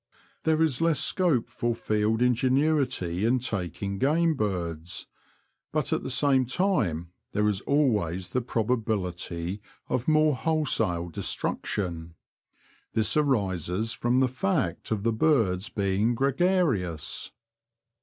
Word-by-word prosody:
There 160 Hz, 0 st, +3 dB
is 150 Hz, -4 st, +1 dB
less 165 Hz, -2 st, +3 dB
scope 165 Hz, -11 st, +1 dB
for 120 Hz, 0 st, -1 dB
field 110 Hz, +1 st, 0 dB
ingenuity 125 Hz, -, +1 dB
in 120 Hz, +3 st, +3 dB
taking 100 Hz, -, -3 dB
game 160 Hz, +4 st, +3 dB
birds; 90 Hz, -, -3 dB, 0.7 s
but -, -, 0 dB
at -, -, 0 dB
the -, -, -5 dB
same 130 Hz, -1 st, +3 dB
time 115 Hz, -, 0 dB, 0.2 s
there 105 Hz, 0 st, +2 dB
is 100 Hz, -2 st, 0 dB
always 105 Hz, -, +1 dB
the 125 Hz, -, 0 dB
proba 115 Hz, 0 st, 0 dB
bility 90 Hz, -2 st, -3 dB, 0.3 s
of 125 Hz, -1 st, -1 dB
more 155 Hz, -2 st, +4 dB
wholesale 125 Hz, -, +1 dB
destruction. 85 Hz, 0 st, -3 dB, 0.8 s
This 110 Hz, -1 st, +2 dB
arises 105 Hz, -, 0 dB
from 120 Hz, +3 st, +1 dB
the 130 Hz, -, +4 dB
fact 130 Hz, -, -1 dB
of 105 Hz, -3 st, -1 dB
the 115 Hz, 0 st, +1 dB
birds 110 Hz, -, +2 dB
being 100 Hz, +4 st, 0 dB
gre 135 Hz, +3 st, +2 dB
garious. 135 Hz, -, 0 dB
115 Hz, 125 wpm, -27 LUFS, 95-140 Hz, 0.8 s, more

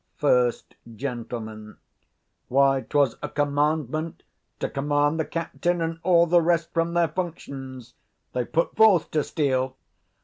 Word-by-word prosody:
First 125 Hz, -4 st, +1 dB, 0.2 s
Gent. 120 Hz, -1 st, -5 dB, 1.2 s
Why, 135 Hz, +1 st, +3 dB
'twas 140 Hz, -5 st, +2 dB
a -, -, -4 dB
commandment 150 Hz, +2 st, -1 dB, 0.4 s
to -, -, -1 dB
command 145 Hz, +2 st, 0 dB
the 160 Hz, -, 0 dB
captain 170 Hz, +1 st, -2 dB
and 165 Hz, 0 st, -2 dB
all 170 Hz, -2 st, +4 dB
the 170 Hz, +1 st, +4 dB
rest 170 Hz, 0 st, +1 dB
from 170 Hz, 0 st, 0 dB
their 170 Hz, -2 st, +3 dB
functions: 140 Hz, -7 st, -6 dB, 0.4 s
they 125 Hz, -1 st, -1 dB
put 165 Hz, +5 st, -1 dB
forth 210 Hz, -7 st, +5 dB
to 155 Hz, -2 st, +1 dB
steal. 130 Hz, -3 st, -1 dB
150 Hz, 130 wpm, -25 LUFS, 135-165 Hz, 1.2 s, forth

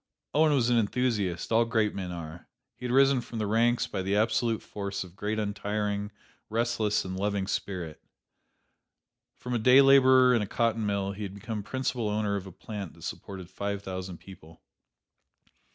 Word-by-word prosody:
Owen 155 Hz, +1 st, +4 dB
was 125 Hz, -4 st, +2 dB
an 120 Hz, -, +4 dB
enthusiast: 105 Hz, -5 st, -1 dB
all 115 Hz, +1 st, +5 dB
great 110 Hz, -2 st, +1 dB
men 95 Hz, -2 st, -4 dB
are. 85 Hz, -1 st, -8 dB, 0.3 s
He -, -, -9 dB
had 125 Hz, -, -2 dB
risen 135 Hz, 0 st, +5 dB
from 115 Hz, 0 st, -8 dB
the 110 Hz, -, -1 dB
ranks 115 Hz, +3 st, +2 dB
by 95 Hz, -, -4 dB
the 95 Hz, +2 st, 0 dB
absolute 110 Hz, +1 st, +1 dB
force 100 Hz, -1 st, -4 dB
of 90 Hz, -, -12 dB
his -, -, -26 dB
great 105 Hz, +2 st, -2 dB
untiring, 105 Hz, 0 st, -2 dB, 0.4 s
restless 115 Hz, -2 st, 0 dB
and 95 Hz, 0 st, -4 dB
loving 100 Hz, 0 st, -1 dB
spirit. 90 Hz, -5 st, -4 dB, 1.4 s
From 125 Hz, -, -5 dB
a 120 Hz, -, +1 dB
day 125 Hz, +4 st, +7 dB
laborer 130 Hz, -2 st, +7 dB
in 120 Hz, -, +3 dB
a 105 Hz, -, -2 dB
cotton 115 Hz, 0 st, 0 dB
mill 100 Hz, -1 st, -1 dB
he 100 Hz, +2 st, -8 dB
had 100 Hz, -1 st, -5 dB
become 105 Hz, +1 st, -5 dB
principal 125 Hz, 0 st, -2 dB
owner 105 Hz, -1 st, 0 dB
of 100 Hz, -1 st, -4 dB
a -, -, -9 dB
plant 100 Hz, -1 st, -7 dB
that -, -, -15 dB
supported 95 Hz, -3 st, -7 dB
five 100 Hz, +2 st, -4 dB
thousand 95 Hz, -2 st, -5 dB
people. 85 Hz, -4 st, -15 dB
105 Hz, 180 wpm, -28 LUFS, 100-120 Hz, 1.4 s, day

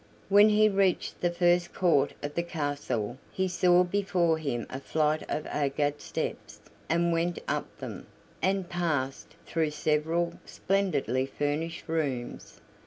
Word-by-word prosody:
When 205 Hz, +2 st, +7 dB
he 215 Hz, 0 st, +5 dB
reached 195 Hz, -3 st, +1 dB
the 175 Hz, -, +2 dB
first 175 Hz, 0 st, +2 dB
court 170 Hz, -7 st, +3 dB
of 145 Hz, 0 st, -3 dB
the 170 Hz, -, 0 dB
castle 145 Hz, -8 st, -3 dB
he 190 Hz, 0 st, 0 dB
saw 180 Hz, 0 st, +4 dB
before 180 Hz, -3 st, +1 dB
him 130 Hz, -7 st, -2 dB
a 130 Hz, -, -6 dB
flight 155 Hz, +2 st, +1 dB
of 155 Hz, -, -2 dB
agate 145 Hz, 0 st, -1 dB
steps, -, -, -5 dB, 0.3 s
and 170 Hz, +1 st, +2 dB
went 170 Hz, +1 st, 0 dB
up -, -, -3 dB
them, -, -, -7 dB, 0.3 s
and 190 Hz, -1 st, +1 dB
passed 155 Hz, -7 st, -2 dB
through 160 Hz, -2 st, 0 dB
several 160 Hz, +3 st, 0 dB
splendidly 140 Hz, -, 0 dB
furnished 150 Hz, +4 st, -3 dB
rooms. 140 Hz, -7 st, -3 dB
165 Hz, 135 wpm, -28 LUFS, 145-175 Hz, 0.3 s, When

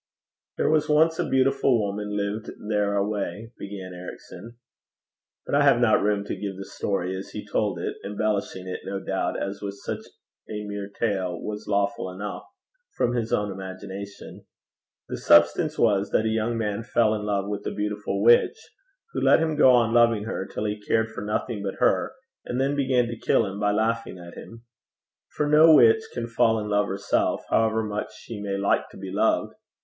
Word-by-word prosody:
'There -, -, +2 dB
was 155 Hz, -1 st, +2 dB
once 160 Hz, +2 st, +3 dB
a -, -, -1 dB
beautiful 130 Hz, -2 st, +3 dB
woman 105 Hz, 0 st, -3 dB
lived 105 Hz, +2 st, -3 dB, 0.2 s
there 105 Hz, -1 st, +1 dB
away,' 105 Hz, +1 st, -2 dB
began 95 Hz, -2 st, -7 dB
Ericson. 90 Hz, +5 st, -10 dB, 0.9 s
But -, -, -5 dB
I 145 Hz, +1 st, +4 dB
have 140 Hz, -4 st, +5 dB
not 120 Hz, -3 st, +4 dB
room 105 Hz, 0 st, +1 dB
to -, -, -4 dB
give 100 Hz, -2 st, -5 dB
the 95 Hz, -, -7 dB
story 95 Hz, -2 st, -2 dB
as 95 Hz, -, -7 dB
he -, -, -7 dB
told -, -, -1 dB
it, -, -, -4 dB
embellishing 100 Hz, -2 st, -2 dB
it, 90 Hz, -, -4 dB
no 100 Hz, 0 st, -4 dB
doubt, 95 Hz, 0 st, -2 dB
as 100 Hz, 0 st, -4 dB
with 100 Hz, -1 st, -5 dB
such -, -, -3 dB, 0.5 s
a 105 Hz, -1 st, -4 dB
mere 100 Hz, -1 st, -5 dB
tale 95 Hz, -5 st, -2 dB
was 105 Hz, 0 st, -6 dB
lawful 100 Hz, -2 st, 0 dB
enough, 100 Hz, +3 st, -6 dB, 0.5 s
from 120 Hz, -, +1 dB
his 115 Hz, -2 st, -2 dB
own 105 Hz, -1 st, 0 dB
imagination. 95 Hz, +1 st, -8 dB, 0.6 s
The -, -, -4 dB
substance 85 Hz, -, +4 dB
was 100 Hz, -3 st, +2 dB
that 110 Hz, -, +1 dB
a -, -, +2 dB
young 110 Hz, +1 st, 0 dB
man 105 Hz, -1 st, -2 dB
fell 115 Hz, -2 st, +2 dB
in 105 Hz, -, -2 dB
love 100 Hz, -1 st, -1 dB
with 105 Hz, 0 st, -4 dB
a -, -, -1 dB
beautiful 105 Hz, -1 st, -2 dB
witch, 120 Hz, +1 st, +5 dB, 0.6 s
who -, -, -2 dB
let -, -, +6 dB
him 160 Hz, -1 st, 0 dB
go 150 Hz, -3 st, +6 dB
on 120 Hz, -2 st, +4 dB
loving 115 Hz, -3 st, +4 dB
her 105 Hz, -3 st, -4 dB
till 105 Hz, -, -4 dB
he 105 Hz, 0 st, -3 dB
cared 110 Hz, +2 st, 0 dB
for 110 Hz, -, -7 dB
nothing 105 Hz, +1 st, -2 dB
but 100 Hz, -1 st, -4 dB
her, -, -, +1 dB, 0.3 s
and 125 Hz, -, -3 dB
then 135 Hz, +2 st, +1 dB
began 130 Hz, -3 st, +2 dB
to 115 Hz, -1 st, -6 dB
kill 115 Hz, -, +2 dB
him 100 Hz, 0 st, -6 dB
by 105 Hz, 0 st, +2 dB
laughing 110 Hz, -1 st, -1 dB
at 85 Hz, -1 st, -11 dB
him. 115 Hz, 0 st, -11 dB, 0.7 s
For 150 Hz, -, -1 dB
no 155 Hz, +2 st, +7 dB
witch 115 Hz, -5 st, +6 dB
can 120 Hz, -, -4 dB
fall 115 Hz, -1 st, +2 dB
in 105 Hz, 0 st, -4 dB
love 105 Hz, 0 st, +2 dB
herself, 100 Hz, +2 st, 0 dB
however 110 Hz, 0 st, +2 dB
much 105 Hz, -1 st, -4 dB
she 110 Hz, -3 st, -8 dB
may 100 Hz, -1 st, -2 dB
like 100 Hz, 0 st, +1 dB
to -, -, -14 dB
be -, -, -7 dB
loved. -, -, +1 dB
105 Hz, 190 wpm, -25 LUFS, 100-115 Hz, 0.9 s, no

